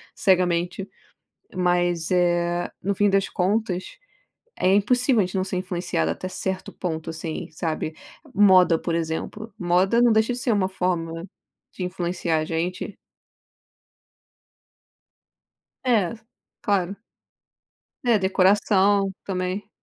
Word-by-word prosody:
cegamente. 180 0 +1 0.7
Mas, 175 -2 +1
eh, 175 -1 +1
no 200 +2 0
fim 205 +1 +3
das 195 0 +2
contas, 195 - -1 0.6
é 185 - +2
impossível 245 +4 +3
a - - +1
gente 185 +2 -7
não 185 - +1
ser 190 -1 -3
influenciado 175 - -1
até 185 - -5
certo 190 0 -4
ponto 160 -3 -4
assim, 160 0 -5
sabe. 160 -1 -3 0.4
Moda, 185 -4 +6
por 170 - -3
exemplo, 165 +7 -3
moda 180 +6 +2
não 240 -1 +5
deixa 220 +2 +3
de - - -4
ser 240 - 0
uma 195 -3 +1
forma 170 -3 -2 0.5
de 185 - -6
influenciar 175 -2 -1
a 155 - -2
gente. 175 +5 -3 2.9
É, 225 -8 +2 0.5
claro. 200 -1 0 1.1
É, 235 -3 +4
decoração 195 +1 +3
também. 185 +1 -3
185 Hz, 115 wpm, -24 LUFS, 175-200 Hz, 2.9 s, Moda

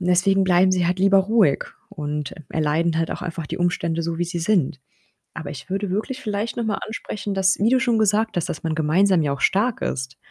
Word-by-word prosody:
Und 175 - -3
deswegen 190 +2 +3
bleiben 185 0 +4
sie 180 -2 +1
halt 180 +2 0
lieber 195 +1 +5
ruhig 195 -7 +3 0.2
und 150 -1 -4
e - - -9 0.2
erleiden 160 +2 0
halt 165 0 -1
auch - - -5
einfach 170 -3 -5
die - - -5
Umstände 170 -2 0
so, 165 0 -3
wie 175 - +1
sie 175 0 -4
sind. 165 -7 +1 0.5
Aber 160 -2 -6
ich 145 +2 -10
würde 195 +1 -2
wirklich 220 +7 -3
vielleicht 210 +2 -3
noch 235 - -1
mal 215 -2 -1
ansprechen, 210 -2 -5
dass 190 0 +2
wie 210 +3 +3
du 260 +1 +4
schon 240 -4 +1
gesagt 215 0 +1
hast, 175 - -1
dass 155 - -5
man 160 -1 -1
gemeinsam 170 +4 +3
ja 145 -2 0
auch 140 - -7
stark 215 +5 +1
ist 130 0 -3
180 Hz, 235 wpm, -22 LUFS, 160-205 Hz, 0.5 s, lieber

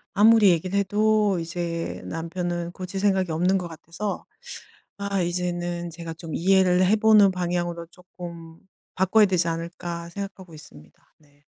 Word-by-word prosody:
아무리 215 -1 +6
얘기를 180 +3 +1
해도 210 -1 +2
이제 170 0 -4
남편은 175 +1 -4
고칠 185 +1 -6
생각이 190 -3 +1
없는 180 +4 +2
것 180 -2 -4
같아서 170 +5 -6 0.7
아 200 -1 -1
이제는 175 0 -2
제가 165 0 -7
좀 165 -1 -9
'이해를 185 0 +4
해 210 +4 +4
보는 215 -2 +6
방향으로 175 -2 -3
쪼끔 170 -2 -11 0.4
바꿔야 190 +4 +4
되지 180 -3 +1
않을까?' 170 +1 -5
생각하고 190 -2 -8
있습니다. 75 - -16
네. 145 -1 -28
175 Hz, 310 characters per minute, -24 LUFS, 170-195 Hz, 0.7 s, 아무리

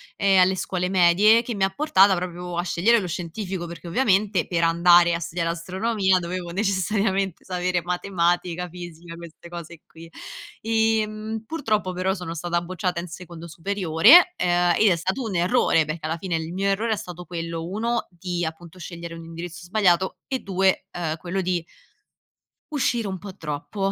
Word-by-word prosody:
ehm, 195 -1 +3
alle 185 +1 +4
scuole 180 -1 -2
medie, 190 +5 +5
che 240 0 -5
mi 195 -1 +2
ha - - 0
portata 200 -5 +4
proprio 175 0 -5
a 175 - 0
scegliere 195 +7 +3
lo 190 - -4
scientifico. 175 +2 -5
Perché 170 +1 -9
ovviamente 195 -3 +2
per 170 -2 0
andare 170 +1 +5
a 170 - -1
studiare 170 0 -2
astronomia 190 +3 0
dovevo 175 0 -5
necessariamente 195 -1 0
sapere 180 -1 -1
matematica, 175 0 -1
fisica, 175 -1 -10
queste 170 0 -12
cose 170 -1 -9
qui. 165 0 -14 0.5
Ehm, 220 -1 0
purtroppo 215 -10 -1
però 185 +1 -1
sono 180 -4 -6
stata 170 +1 -2
bocciata 180 0 -3
in 175 - -8
secondo 170 0 -10
superiore 195 - +5
ehm 175 -1 +2
e 210 -4 +5
è - - 0
stato 190 +10 -2
un 215 -5 -4
errore, 175 -1 +3
perché 155 +1 -5
alla 160 +1 -2
fine 175 -1 -2
il 160 +1 -5
mio 195 +2 -1
errore 220 +3 +1
è - - 0
stato 180 -3 -8
quello: 165 -1 -5
1 230 +5 -2
di 175 0 -4
appunto 165 +2 -8
scegliere 170 -1 -8
un 165 0 -10
indirizzo 170 +2 -8
sbagliato 185 -1 +2
e 265 -2 -1
2, 190 -2 +1
uhm, 160 -2 -3
quello 180 +3 -3
di 180 -1 -1 1.1
uscire 240 -5 0
un 190 - -4
po' 195 0 -10
troppo, 180 +5 -3
180 Hz, 170 wpm, -24 LUFS, 170-195 Hz, 1.1 s, medie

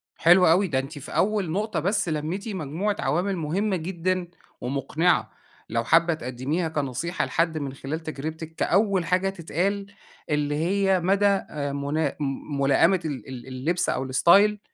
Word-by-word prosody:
حلو 175 +2 +6
أوي، 185 +4 +4
ده 135 -5 0
أنتِ 145 +3 -6
في 140 - -10
أول 200 -5 +1
نقطة 205 0 -1
بس 185 +1 0
لميتِ 160 +8 -3
مجموعة 190 +3 -2
عوامل 185 +4 0
مهمة 185 +6 -1
جدًا 180 +1 -2 0.3
ومقنعة، 140 +7 0 0.4
لو 115 +1 0
حابة 165 +6 +4
تقدميها 145 +5 -2
كنصيحة 150 +3 -2
لحد 165 -1 0
من 140 -3 -4
خلال 145 +4 -5
تجربتك 160 +2 -6
كأول 195 -1 +2
حاجة 185 +3 +1
تتقال، 195 +3 -2 0.4
اللي 150 -1 0
هي 190 +4 +2
مدى 195 +3 +2
آآ 150 -8 0
منا 140 +1 -1
م 140 0 -3
ملائمة 140 +7 +4
ال 145 -5 -5
ال 130 0 -8
اللبس 140 +7 -1
أو 130 - -1
الاستايل 195 +10 +4
165 Hz, 150 wpm, -25 LUFS, 145-190 Hz, 0.4 s, حلو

